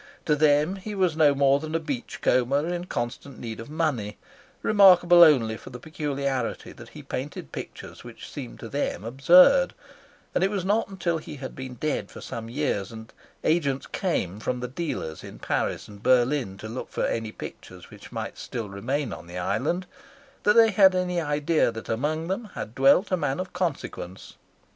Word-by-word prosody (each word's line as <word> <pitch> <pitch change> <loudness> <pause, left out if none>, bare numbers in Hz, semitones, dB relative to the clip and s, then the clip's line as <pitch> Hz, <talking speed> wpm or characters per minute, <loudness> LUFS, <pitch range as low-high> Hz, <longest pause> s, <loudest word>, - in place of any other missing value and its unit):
To 150 - +3
them 150 +4 +3
he 205 +2 -6
was 185 -5 +1
no 150 -3 +4
more 140 0 +4
than 155 +1 -5
a - - +2
beach 145 -6 -5
comber 140 +5 +2
in 175 0 -3
constant 125 -1 -5
need 115 -2 -6
of 115 - -8
money, 145 -10 -1 0.5
remarkable 180 -4 +7
only 125 -9 +6
for - - -12
the 125 - -8
peculiarity 140 -4 -3
that - - -13
he - - -11
painted 130 - -6
pictures - - -8
which - - -10
seemed - - -8
to - - -6
them 90 - -2
absurd; 175 - +5 0.6
and - - +1
it 190 - +3
was 195 -3 -2
not 200 -1 0
till 170 -2 0
he 155 - -9
had 135 -2 -7
been 130 -1 -7
dead 150 +5 -2
for - - -11
some 115 0 -7
years 120 -7 -2
and 110 0 -11 0.3
agents 145 -5 +1
came 105 - -2
from 125 +3 -2
the 125 - -3
dealers 125 - -4
in - - -10
Paris - - -2
and 100 -1 -13
Berlin 125 -4 +2
to 110 - -8
look 115 +4 -6
for - - -1
any 115 -1 -2
pictures - - -10
which - - -13
might - - -5
still 115 -4 -5
remain 120 +6 -2
on 85 - -10
the 90 +1 -8
island, 140 - -1 0.6
that 210 - +3
they 225 -1 +7
had 190 -1 +6
any 180 -1 0
idea 150 -2 +1
that 110 -1 -8
among 155 +8 -1
them 195 +5 -2
had 110 - -6
dwelt 140 - +4
a 185 - +3
man 145 -3 -1
of 185 - -5
consequence. 160 - -4
145 Hz, 185 wpm, -26 LUFS, 120-175 Hz, 0.6 s, remarkable